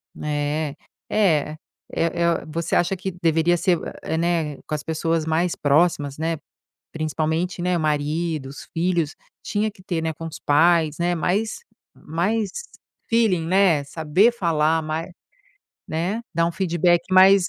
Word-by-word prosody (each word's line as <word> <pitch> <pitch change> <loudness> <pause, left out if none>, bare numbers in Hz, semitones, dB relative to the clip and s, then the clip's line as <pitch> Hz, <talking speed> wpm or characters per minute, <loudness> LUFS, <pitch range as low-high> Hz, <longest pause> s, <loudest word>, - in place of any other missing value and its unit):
Né. 150 0 -2 0.3
É, 155 -7 +2 0.3
eh 165 - +1
eh, 170 -1 +1
você 165 +2 -2
acha 175 +2 +2
que 190 +1 -4
deveria 165 +1 +3
ser, 175 0 +2 0.2
eh, 160 - -2
né, 165 -4 0
com - - -5
as 150 - -5
pessoas 160 0 -1
mais 165 +2 +1
próximas, 145 -1 +2
né, 165 0 -1 0.5
principalmente, 160 +3 -2
né, 180 0 +1
maridos, 150 -2 -2
filhos. 170 -2 0 0.3
Tinha 215 +1 0
que 185 -2 -19
ter, 175 -4 -2
né, 160 0 -1
com 165 +2 -7
os 160 - -8
pais, 160 0 +3
né, 175 +1 +1
mais 200 +7 0 0.4
mais 195 +7 -1 0.6
feeling, 220 -8 +2
né. 185 -6 +4
Saber 160 +10 +2
falar 160 -6 +1
mai 155 +3 -4 0.8
né? 175 +8 -2
Dar 165 0 +3
um 170 - 0
feedback 175 -1 +2
mais 190 0 +7
165 Hz, 140 wpm, -23 LUFS, 155-180 Hz, 0.8 s, mais